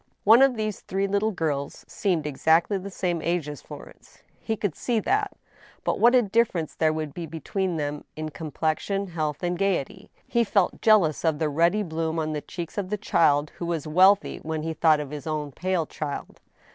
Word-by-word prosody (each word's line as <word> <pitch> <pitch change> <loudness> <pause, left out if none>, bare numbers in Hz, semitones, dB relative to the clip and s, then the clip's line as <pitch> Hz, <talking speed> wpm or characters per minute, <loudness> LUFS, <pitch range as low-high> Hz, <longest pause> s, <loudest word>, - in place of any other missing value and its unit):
One 225 +5 +7
of 270 -2 +5
these 215 -3 -3
three 195 +1 -2
little 200 +2 +1
girls 150 -7 -3
seemed 175 -7 -1
exactly 160 +7 +2
the 195 +2 -7
same 175 -3 -2
age 170 -2 -1
as 145 -3 -7
Florence: - - -13 0.2
he 220 - -2
could 205 -6 -1
see 235 +6 -1
that; 400 - 0 0.5
but - - -1
what 240 +2 +6
a 250 - +5
difference 195 -6 0
there 160 -1 +2
was 155 -1 -3
be 165 +3 -6
tween 170 +3 -3
them 145 -1 -3
in 155 +1 -4
complexion, 160 +6 -2
health, 155 -2 -3
and 175 0 -1
gayety 195 -8 -1
I - - -36
He 235 - +2
felt 200 -4 +1
jealous 200 -9 +4
of 160 -3 +2
the 155 0 0
ruddy 170 +8 +2
bloom 160 -2 -2
on 155 -1 -1
the 150 - -3
cheeks 170 +5 -6
of 190 -2 -4
the 210 - -1
child 150 -7 +2
who 170 - -3
was 165 -3 -2
wealthy 185 +6 +4
when 155 -1 -4
he 160 0 -2
thought 160 -1 +4
of 145 -2 -5
his 150 -1 -7
own 150 -2 -3
pale 180 +2 -1
child. 145 -1 -6
170 Hz, 200 wpm, -25 LUFS, 155-200 Hz, 0.5 s, One